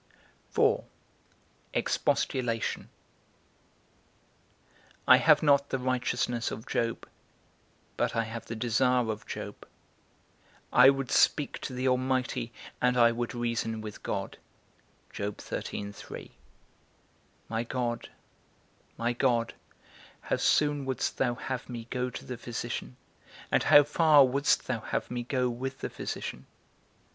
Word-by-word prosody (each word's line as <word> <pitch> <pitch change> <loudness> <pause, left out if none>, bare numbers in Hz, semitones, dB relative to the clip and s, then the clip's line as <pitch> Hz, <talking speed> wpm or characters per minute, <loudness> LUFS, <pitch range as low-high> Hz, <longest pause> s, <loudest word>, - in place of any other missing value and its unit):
IV. - - +4 1.0
EXPOSTULATION. 115 -3 0 2.2
I - - +9
have - - +5
not 140 -1 +4
the - - 0
righteousness 125 -2 -1
of 110 - -7
Job, 115 -1 -2 0.9
but - - 0
I 115 - +2
have 115 0 -7
the 115 - -5
desire 125 +1 +2
of 105 0 -7
Job: - - -6 1.1
I - - +9
would 135 -2 0
speak 145 -3 +3
to 130 - -6
the 130 +1 -1
Almighty, 130 -2 0 0.3
and 125 0 +3
I 120 -1 +6
would 120 +1 -3
reason 115 -2 -1
with 110 -1 -8
God. - - -4 0.8
My 100 0 -2 2.3
God, 120 -1 -3 0.9
my 120 +1 0
God, 120 -2 +1 0.7
how - - -1
soon 145 -1 +2
wouldst 130 -1 -2
thou 120 -2 +1
have 130 +1 -5
me 120 -2 -6
go 125 0 -1
to - - -8
the 125 - -5
physician, 110 - -5 0.5
and - - +4
how 145 - +7
far 150 -1 +6
wouldst 140 +3 +2
thou 130 -3 -1
have 110 - -3
me 120 0 -2
go 125 +1 0
with 130 +2 -4
the - - -4
physician? - - -5
125 Hz, 115 wpm, -29 LUFS, 115-130 Hz, 2.3 s, I